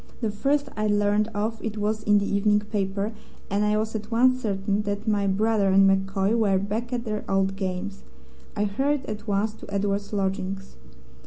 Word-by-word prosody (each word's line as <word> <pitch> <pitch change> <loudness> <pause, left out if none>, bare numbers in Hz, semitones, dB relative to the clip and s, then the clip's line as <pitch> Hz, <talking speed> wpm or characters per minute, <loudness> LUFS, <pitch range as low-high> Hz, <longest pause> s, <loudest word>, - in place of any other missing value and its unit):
The 225 -3 -1
first 280 +7 0
I 215 0 0
learned 205 0 +2
of 215 +2 -2
it 220 -1 -3
was 215 +1 -1
in 210 -1 +4
the 200 - +1
evening 205 +1 +2
paper, 200 0 -2 0.4
and 200 +1 +2
I 210 0 +2
was 220 +1 -1
at 215 -1 -5
once 255 +2 +3
certain 200 -1 0
that 205 +1 -3
my 205 -2 +2
brother 205 +1 +2
and 195 +1 +6
MacCoy 195 +2 +2
were 205 -4 +3
back 215 +5 -3
at 245 -1 -2
their 215 -1 -3
old 195 0 +1
games. 195 +1 -4 0.5
I 205 - +1
hurried 270 +7 0
at 215 +1 -6
once 205 +1 +1
to 210 - -12
Edward's 200 0 -1
lodgings. 195 -1 -2
205 Hz, 185 wpm, -25 LUFS, 195-215 Hz, 0.5 s, and